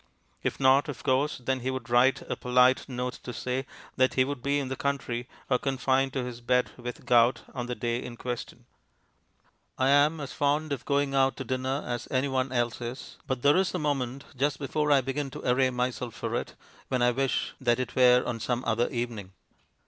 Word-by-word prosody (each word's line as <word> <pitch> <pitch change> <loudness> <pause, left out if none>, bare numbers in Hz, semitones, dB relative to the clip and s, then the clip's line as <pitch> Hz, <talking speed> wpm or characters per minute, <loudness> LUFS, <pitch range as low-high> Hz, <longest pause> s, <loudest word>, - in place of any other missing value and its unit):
If - - -2
not, 135 +2 +4
of 135 - -7
course, 135 +3 +1
then 130 +1 -1
he 130 +1 -2
would 130 0 -4
write 125 +2 +3
a - - -4
polite 125 +2 +3
note 125 0 -4
to 125 - -6
say 125 +3 -3 0.3
that 130 0 +3
he 130 - +5
would 140 -1 -4
be 140 +2 +1
in 140 -2 -2
the 130 - -3
country, 125 -3 -2 0.2
or 125 -2 +2
confined 135 0 +1
to 130 - -1
his 125 -1 -7
bed 125 +1 +1
with 125 0 -7
gout, 120 0 +4
on 120 -1 -4
the 125 - -3
day 120 +2 -2
in 120 -1 -8
question. 120 -1 -6 1.1
I 130 +1 +2
am 145 +3 +4
as 140 -2 -6
fond 145 +1 +1
of 130 - -6
going 140 -1 +1
out 135 -1 +2
to 135 - -4
dinner 130 +2 -2
as 120 0 -4
anyone 130 -1 0
else 120 -2 -1
is, 120 +2 -7
but 130 -3 -2
there 145 +4 +5
is 190 -1 +1
a - - +1
moment, 140 -4 -2
just 140 +2 0
before 150 +1 -1
I 140 -2 +6
begin 135 +2 -3
to 130 - -7
array 130 +1 +3
myself 125 -1 -2
for - - -4
it, - - -4 0.3
when 125 -2 0
I 120 - +5
wish 135 0 -1
that 120 -1 +2
it 130 - -4
were 125 -1 +6
on 120 -1 -3
some 120 +2 -1
other 115 +1 +1
evening. 115 -6 -4
130 Hz, 210 wpm, -28 LUFS, 125-135 Hz, 1.1 s, I